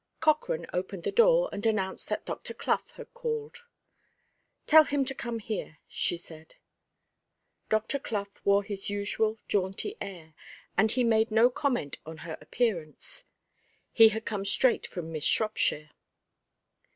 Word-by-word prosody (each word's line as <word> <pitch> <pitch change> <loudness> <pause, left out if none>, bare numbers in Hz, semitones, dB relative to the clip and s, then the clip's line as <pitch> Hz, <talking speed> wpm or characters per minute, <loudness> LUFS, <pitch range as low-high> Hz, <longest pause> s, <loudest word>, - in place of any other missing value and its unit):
Cochrane 320 +11 +1
opened 180 0 -3
the - - -1
door, - - +5
and 205 - -5
announced 205 -4 0
that - - -3
Dr. - - -5
Clough - - 0
had - - -11
called. 470 -1 -5 1.0
"Tell 315 0 +8
him 285 -2 0
to 270 - -2
come 235 -2 -4
here," 210 -7 -5
she 175 - -1
said. 160 -2 -12 1.1
Dr. 220 +6 0
Clough 210 -6 -3 0.2
wore 200 0 +4
his 200 -1 -3
usual 210 +2 -1
jaunty 195 - -1
air, 165 -5 -8 0.4
and 220 +2 +4
he 250 +3 +2
made 225 -1 +3
no 225 +3 +4
comment 245 - -1
on 160 0 -9
her 160 -2 -5
appearance; 180 -11 -3 0.7
he 225 -1 +8
had 220 +1 -5
come 205 -3 -2
straight 200 +5 +3
from 165 -2 -6
Miss 155 -2 -4
Shropshire. 155 -8 +1
215 Hz, 140 wpm, -29 LUFS, 190-255 Hz, 1.1 s, Tell